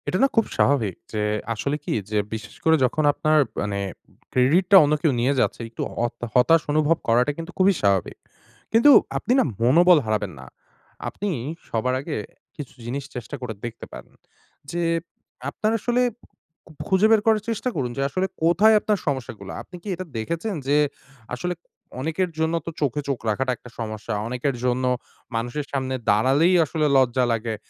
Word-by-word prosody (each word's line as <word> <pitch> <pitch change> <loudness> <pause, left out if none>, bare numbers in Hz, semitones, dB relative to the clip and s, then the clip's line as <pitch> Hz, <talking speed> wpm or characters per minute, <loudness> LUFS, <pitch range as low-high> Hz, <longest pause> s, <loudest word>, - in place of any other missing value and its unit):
এটা 185 - 0
না - - +7
খুব 225 - +5
স্বাভাবিক। 115 -10 +2 0.2
যে 105 - -1 0.3
আসলে 140 +7 -2
কি? - - -2 0.2
যে 105 - +1 0.2
বিশেষ 110 +1 -7
করে 160 0 +5
যখন 155 +5 0
আপনার 155 +1 +2 0.2
মানে 100 -1 -2 0.5
ক্রেডিটটা 170 +10 +4
অন্য 150 +1 +2
কেউ 160 - +3
নিয়ে 130 +4 +2
যাচ্ছে - - 0
একটু 115 - -7 0.2
অত 120 - -6
হতাশ 160 +6 +5
অনুভব 155 +2 +3
করাটা 120 +5 +3
কিন্তু 165 +2 -6
খুবই 190 +1 +4
স্বাভাবিক। 100 -3 +1 0.5
কিন্তু 235 +6 +6 0.3
আপনি - - -3
না - - +5 0.2
মনোবল 170 +9 +6
হারাবেন 105 -3 -1
না। 65 - -10 0.6
আপনি 205 - -4 0.4
সবার 125 +3 0
আগে 150 +2 -4 0.4
কিছু 145 -4 -8
জিনিস 135 +4 -3
চেষ্টা 125 +3 -6
করে 125 -3 -4
দেখতে 120 -1 -7
পারেন। - - -11 0.6
যে 175 - -2 0.7
আপনার 215 +9 -1
আসলে 240 +3 +1 0.9
খুঁজে 195 +2 +4
বের 220 -2 +5
করার 220 -1 +3
চেষ্টা 230 +3 -1
করুন 130 -5 -2
যে - - 0
আসলে 185 +6 -1 0.2
কোথায় 190 +7 +5
আপনার 210 0 0
সমস্যাগুলা। 120 -8 -4
আপনি 180 - -13
কি - - -11
এটা 185 +2 -6
দেখেছেন 170 - -3
যে 145 +1 +3 0.6
আসলে 175 +8 -3 0.5
অনেকের 165 +5 -1
জন্য 160 +1 +1
তো - - -3
চোখে 145 0 0
চোখ 135 -3 -1
রাখাটা 130 +4 0
একটা 125 - -14
সমস্যা। 110 0 -4
অনেকের 125 +3 -2
জন্য 125 +1 +1 0.5
মানুষের 120 +6 -2
সামনে 130 -1 -2
দাঁড়ালেই 135 - +4
আসলে 155 +1 -1
লজ্জা 130 -1 +3
লাগে। 115 -1 -1
140 Hz, 165 wpm, -23 LUFS, 120-175 Hz, 0.9 s, না